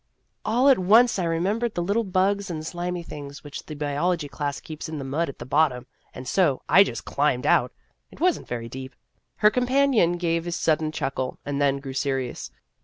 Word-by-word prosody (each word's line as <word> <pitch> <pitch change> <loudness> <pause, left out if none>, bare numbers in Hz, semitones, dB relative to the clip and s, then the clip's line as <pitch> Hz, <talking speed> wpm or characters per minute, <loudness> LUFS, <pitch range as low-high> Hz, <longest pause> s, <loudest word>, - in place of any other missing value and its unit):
" - - -48
All 245 +5 +3
at 270 -6 +6
once 220 +4 +5
I 180 - 0
remembered 200 +8 0
the 175 - -1
little 205 +6 +1
bugs 195 +1 0
and 155 -2 -5
slimy 175 +1 -4
things 145 -3 -9
which 145 -1 -8
the 155 - -6
biology 150 +3 -1
class 145 -1 -4
keeps 155 0 -8
in 155 - -5
the 140 - -5
mud 150 +5 -1
at 140 - -9
the 120 - -8
bottom, 130 -3 +1 0.3
and 125 - -9
so 150 -4 +2
I 195 - +7
just - - -6
climbed - - 0
out. - - +3 0.4
It - - -16
was 360 0 +2
n't - - -14
very 115 -1 -4
deep." 130 +2 -8 0.4
Her 210 0 +4
companion 250 -7 +3
gave 170 -1 -1
a - - -2
sudden 155 -2 +1
chuckle, 130 -3 -3
and 145 0 -2
then 140 -1 +3
grew 135 -1 -7
serious. 135 -2 -2
165 Hz, 205 wpm, -25 LUFS, 140-195 Hz, 0.4 s, I